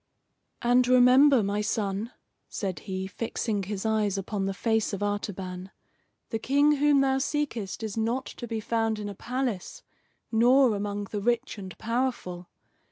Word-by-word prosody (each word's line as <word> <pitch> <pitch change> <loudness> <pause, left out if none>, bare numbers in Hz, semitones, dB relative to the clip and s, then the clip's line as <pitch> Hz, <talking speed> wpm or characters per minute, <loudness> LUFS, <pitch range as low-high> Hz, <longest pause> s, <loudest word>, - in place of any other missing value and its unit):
"And 245 +1 +4
remember, 255 +1 +6
my 200 +1 -1
son," 210 +1 -2 0.4
said 190 -3 -3
he, 190 0 -2
fixing 210 +1 -2
his 195 +1 -4
eyes 215 -3 +1
upon 195 0 -2
the 195 - -1
face 220 0 0
of 200 +1 -2
Artaban, 190 -2 -4 0.6
"the 225 - -1
King 285 +5 +3
whom 290 -1 +4
thou 265 0 +2
seekest 265 -8 -2
is 220 -1 -4
not 235 +4 0
to 240 - -8
be 225 -1 -3
found 225 0 0
in 205 -1 -5
a - - -6
palace, 250 - -4 0.5
nor 245 +2 +5
among 205 0 -3
the 205 - -2
rich 235 +1 0
and 190 -2 -8
powerful. 230 -7 -2
220 Hz, 155 wpm, -27 LUFS, 200-250 Hz, 0.6 s, remember